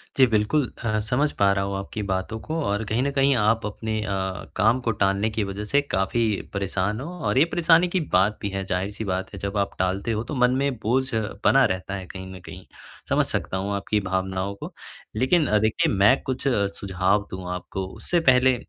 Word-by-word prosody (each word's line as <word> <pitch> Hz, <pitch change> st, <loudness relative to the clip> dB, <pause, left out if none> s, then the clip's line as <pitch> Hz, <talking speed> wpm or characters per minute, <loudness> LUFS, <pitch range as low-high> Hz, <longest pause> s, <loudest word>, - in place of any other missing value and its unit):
जी, 130 Hz, -, +6 dB
बिल्कुल 115 Hz, +5 st, +1 dB
अ, 110 Hz, -1 st, +1 dB
समझ 125 Hz, +7 st, 0 dB
पा 100 Hz, -1 st, +5 dB
रहा 95 Hz, 0 st, 0 dB
हूँ 100 Hz, 0 st, -3 dB
आपकी 100 Hz, +2 st, -5 dB
बातों 95 Hz, +4 st, -2 dB
को 160 Hz, -, -5 dB
और 105 Hz, +2 st, 0 dB
कहीं 110 Hz, +4 st, 0 dB
न 140 Hz, -, 0 dB
कहीं 135 Hz, -1 st, +3 dB
आप 115 Hz, 0 st, +2 dB
अपने 110 Hz, +1 st, -3 dB
अ, 105 Hz, -, -4 dB, 0.5 s
काम 110 Hz, +6 st, +3 dB
को 115 Hz, -, 0 dB
टालने 100 Hz, +1 st, +1 dB
की 110 Hz, -1 st, -1 dB
वज़ह 100 Hz, +1 st, -4 dB
से 140 Hz, +7 st, +2 dB
काफ़ी 115 Hz, -2 st, 0 dB, 0.3 s
परेशान 100 Hz, +2 st, -1 dB
हो 150 Hz, +6 st, -6 dB, 0.2 s
और -, -, +1 dB
ये 150 Hz, -, +6 dB
परेशानी 170 Hz, +1 st, +4 dB
की 180 Hz, +1 st, 0 dB
बात 95 Hz, +4 st, +3 dB
भी 100 Hz, -, -2 dB
है, 95 Hz, 0 st, -3 dB
ज़ाहिर-सी 95 Hz, +4 st, -2 dB
बात 95 Hz, +1 st, -3 dB
है, 100 Hz, -, -7 dB
जब 100 Hz, +1 st, -3 dB
आप 100 Hz, 0 st, -1 dB
टालते 95 Hz, +5 st, 0 dB
हो 110 Hz, +1 st, -1 dB
तो 140 Hz, +5 st, -6 dB
मन 125 Hz, 0 st, +4 dB
में 140 Hz, -2 st, 0 dB
बोझ 130 Hz, +4 st, +1 dB
बना 110 Hz, +5 st, +2 dB
रहता 95 Hz, -1 st, -2 dB
है 95 Hz, -1 st, -6 dB
कहीं 95 Hz, -1 st, -8 dB
न -, -, -9 dB
कहीं, -, -, -10 dB, 0.4 s
समझ -, -, +3 dB
सकता 95 Hz, -, -2 dB
हूँ 100 Hz, +2 st, -2 dB
आपकी 105 Hz, +1 st, 0 dB
भावनाओं 95 Hz, +1 st, -2 dB
को। -, -, -8 dB, 0.4 s
लेकिन 150 Hz, +5 st, +3 dB, 0.2 s
देखिए 110 Hz, 0 st, +1 dB
मैं 100 Hz, +8 st, +4 dB
कुछ 130 Hz, +1 st, -2 dB
सुझाव 100 Hz, -2 st, 0 dB
दूँ 95 Hz, -1 st, -6 dB
आपको, 95 Hz, +1 st, -5 dB
उससे 175 Hz, -, -1 dB
पहले 130 Hz, 0 st, +5 dB
105 Hz, 210 wpm, -24 LUFS, 95-125 Hz, 0.5 s, जी